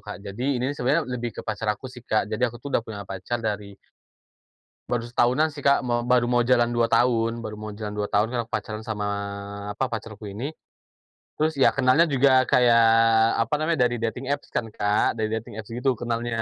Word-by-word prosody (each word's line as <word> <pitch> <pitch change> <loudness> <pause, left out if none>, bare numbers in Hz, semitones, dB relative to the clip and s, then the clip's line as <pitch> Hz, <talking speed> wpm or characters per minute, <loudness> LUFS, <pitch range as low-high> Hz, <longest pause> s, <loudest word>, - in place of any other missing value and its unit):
Kak. 105 -1 -9
Jadi 125 +7 -2
ini 125 - -2
nih - - -9
sebenarnya 145 +6 +1
lebih 120 -3 -4
ke - - -4
pacar 110 0 -3
aku 105 +4 -2
sih, 125 - -11
Kak. 110 -3 0
Jadi 115 +4 -2
aku 120 - -10
tuh 140 +4 -8
udah - - +3
punya 105 -3 -8
pacar 100 +5 -4
dari 100 -2 -3 1.2
baru 120 -1 +1
setahunan 125 +6 +2
sih 145 -2 -10
Kak, 140 - +6
mo 120 - +1 0.2
baru 125 -1 +4
mo 120 - +4
jalan 120 -1 +4
2 120 0 +3
tahun 115 -1 +2
baru 110 -1 -6
mo 110 - -5
jalan 105 - -3
2 105 - 0
tahun 105 +2 +3
kan 120 - +1
pacaran 110 0 -3
sama, 105 -2 -3 0.7
apa, 135 - -1
pacarku 110 -1 -6
ini. 110 +7 -6 0.9
Terus 155 +1 +1
ya, - - +7
kenalnya 135 +4 +4
juga 135 +1 +4 0.2
kayak, 120 -2 +5 0.6
apa 115 - -2
namanya, 160 -1 0
dari 120 0 0
dating 120 +3 -3
apps 145 - -6
kan, - - -1
Kak. 105 +1 +1
Dari 110 -1 -1
dating 110 +1 -4
apps 105 - -18
gitu 125 +3 0
kenalnya. 115 0 -2
120 Hz, 205 wpm, -25 LUFS, 110-125 Hz, 1.2 s, ya